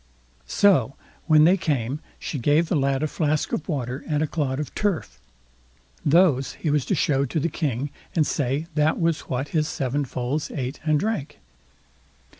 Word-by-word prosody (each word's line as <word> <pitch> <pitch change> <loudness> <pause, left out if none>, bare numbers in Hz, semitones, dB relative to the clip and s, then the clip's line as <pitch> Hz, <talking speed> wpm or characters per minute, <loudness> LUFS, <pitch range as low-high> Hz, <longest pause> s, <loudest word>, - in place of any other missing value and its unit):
So, 140 - +3 0.3
when 155 -2 +6
they 180 +5 +5
came, 140 -5 -1 0.2
she 145 - -4
gave 150 +6 +2
the - - +1
lad 140 0 +1
a - - +2
flask 155 -1 -1
of 160 - -3
water 130 -3 -3
and 150 -1 +1
a - - +2
clod 140 -4 -2
of 150 - -5
turf. 205 -6 -2 0.8
Those 145 -5 +3
he 155 - -2
was 145 -3 +1
to - - 0
show 140 -2 +2
to 150 +5 -2
the 170 - 0
King, 140 -3 -2 0.2
and 160 -3 +3
say 140 +3 -1
that 150 +1 +2
was 165 -2 0
what 130 +2 -2
his 155 -2 +1
seven 140 -1 -1
foals 130 +4 -3
ate 130 0 -4
and 155 -1 +2
drank. 210 -6 -2
150 Hz, 175 wpm, -24 LUFS, 135-160 Hz, 0.8 s, when